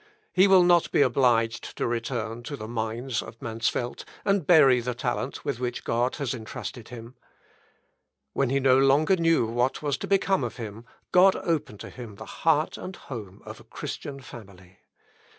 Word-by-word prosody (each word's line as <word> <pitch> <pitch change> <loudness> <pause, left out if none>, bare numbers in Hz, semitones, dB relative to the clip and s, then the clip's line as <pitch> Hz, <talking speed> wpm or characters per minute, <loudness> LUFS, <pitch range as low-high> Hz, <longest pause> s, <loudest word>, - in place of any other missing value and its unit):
He 185 +2 +5
will 190 -2 +6
not 175 -1 +4
be - - +4
obliged 120 -3 +1
to - - -1
return 115 -1 -3
to 145 - -5
the 110 - -7
mines 115 +2 -3
of 110 +1 -11
Mansfeld, 115 +1 -2 0.2
and 195 -6 +1
bury 140 -7 +6
the 120 0 -3
talent 125 +3 -3
with 140 -5 -2
which 125 -1 -3
God 120 +2 0
has 140 -4 -2
entrusted 115 0 -7
him. 120 0 -10 1.2
When 135 -2 +1
he 135 +1 +1
no 130 -1 +4
longer 140 +7 +4
knew 165 -7 +2
what 120 +5 -1
was 145 -2 0
to - - -5
become 195 -4 +2
of 120 - -4
him 110 -1 -7 0.3
God 185 +1 +6
opened 150 - -2
to - - -8
him 120 -5 -9
the - - -10
heart 155 -1 0
and 185 - -7
the - - -16
home 105 -6 -9
of - - -9
a - - -15
Christian 140 -1 -7
family. 95 -7 -13
125 Hz, 180 wpm, -26 LUFS, 115-145 Hz, 1.2 s, will